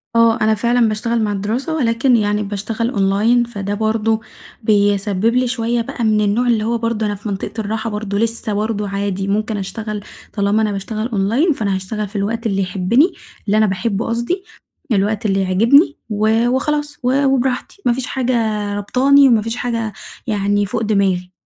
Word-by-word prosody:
آه، 230 0 +4
أنا 215 0 +3
فعلًا 235 +2 +2
باشتغل 230 +2 -1
مع 210 -1 0
الدراسة، 225 +10 -2
ولكن 245 -2 +2
يعني 210 -1 +1
باشتغل 215 +3 -3
أونلاين، 210 +3 +2
فده 205 -4 -4
برضو 220 +1 0 0.4
بيسبب 205 -1 +1
لي 250 0 +2
شوية 235 0 -1
بقى 230 - -5
من 215 -1 +3
النوع 210 +4 +1
اللي 225 -3 +2
هو 235 +2 0
برضو 230 -1 -1
أنا 205 -1 -1
في 205 +2 -7
منطقة 195 -1 -4
الراحة 220 +1 -2
برضو، 210 -1 -3
لسه 225 0 0
برضو 210 0 -1
عادي، 200 -1 -2
ممكن 215 +2 -1
أشتغل 210 +2 -5 0.3
طالما 205 +1 +1
أنا 215 -1 +1
بشتغل 215 +3 -3
أونلاين، 230 - +1
فأنا 205 -6 -1
هاشتغل 205 +3 -4
في 205 - -18
الوقت 220 +3 -2
اللي 195 -3 0
يحبني 195 - +2 0.3
اللي 205 +1 +2
أنا 215 - +4
باحبه 200 +2 -1
قصدي، 235 +12 -2 0.5
الوقت 210 +1 0
اللي 195 -2 +2
يعجبني، 230 - +4
و 220 +2 +2
وخلاص، 295 +3 -1
و 265 +3 +2
وبراحتي، 265 +7 -1
ما 240 - +4
فيش 255 +1 -3
حاجة 255 -1 -1 0.4
رابطاني، 270 +7 +4
وما 230 -4 +4
فيش 225 +2 -4
حاجة 230 -3 -2 0.3
يعني 205 -1 +1
فوق 215 +3 -3
دماغي، 195 -4 0
220 Hz, 175 wpm, -18 LUFS, 205-235 Hz, 0.5 s, آه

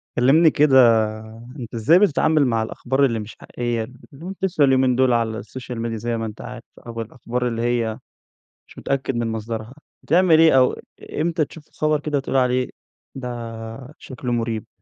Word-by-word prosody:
كلّمني 150 +6 +5
كده، 145 -2 +4 0.8
أنت 120 -1 -8
إزاي 150 +11 +5
بتتعامل 155 -5 +3
مع 115 -2 +1
الأخبار 135 +5 0
اللي 115 -4 0
مش 105 +1 -8
حقيقية، 120 -2 -3 0.3
المنتشرة 175 0 -1
اليومين 130 -1 +3
دول 130 0 +3
على 115 -2 0
السوشيال 120 +2 -7
ميديا 115 -1 -3
زيّ 115 +2 -2
ما 115 - -3
أنت 105 -1 -8
عارف، - - -8 0.2
أو 115 -1 -5
الأخبار 125 +2 -3
اللي 115 -1 -2
هي 120 -2 -1 0.7
مش - - -18
متأكد 135 -1 -2
من 120 -1 -1
مصدرها، 110 +1 -5 0.3
بتعمل 170 -1 +4
إيه 160 -4 +6
أو 130 -1 +4 0.3
إ - - -5
إمتى 165 -1 +1
تشوف 150 +1 -14
الخبر 155 -1 0
كده 150 -1 -1
تقول 135 - -4
عليه 125 0 +1 0.5
ده 130 -2 -5 0.7
شكله 125 -1 -6
مريب؟ 115 -2 -2
125 Hz, 165 wpm, -22 LUFS, 115-145 Hz, 0.8 s, إيه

